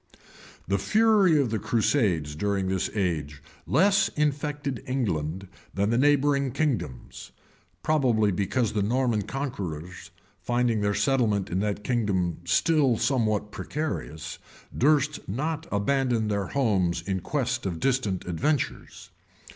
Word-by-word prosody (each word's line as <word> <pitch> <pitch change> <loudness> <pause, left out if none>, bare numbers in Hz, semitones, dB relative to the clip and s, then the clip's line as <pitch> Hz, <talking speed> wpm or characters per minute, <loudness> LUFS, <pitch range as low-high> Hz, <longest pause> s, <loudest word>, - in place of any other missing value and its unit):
The 100 0 +1
fury 200 - +4
of 130 -6 0
the 110 - 0
crusades 105 - +1
during 100 +2 -1
this 95 -1 -1
age 75 -8 -2 0.3
less 195 +7 +4
infected 145 -2 -1
England 95 - -2 0.3
than 100 +3 +1
the 115 - +2
neighboring 140 -2 +2
kingdoms; 115 - -3 0.5
probably 125 -9 +2
because 105 +5 0
the 105 - 0
Norman 120 +1 +1
conquerors, 90 - -5 0.3
finding 120 -3 0
their 100 0 +1
settlement 115 -9 +1
in 90 - 0
that 105 0 -2
kingdom 100 -9 0
still 135 - +3
somewhat 110 -6 0
precarious, 140 - -5 0.4
durst 150 +2 +2
not 155 +9 -3
abandon 115 +1 +1
their 100 -2 -1
homes 95 -10 0
in 95 0 -2
quest 120 - -2
of 85 -3 -4
distant 120 -8 0
adventures. 135 - -2
115 Hz, 120 wpm, -26 LUFS, 95-140 Hz, 0.5 s, fury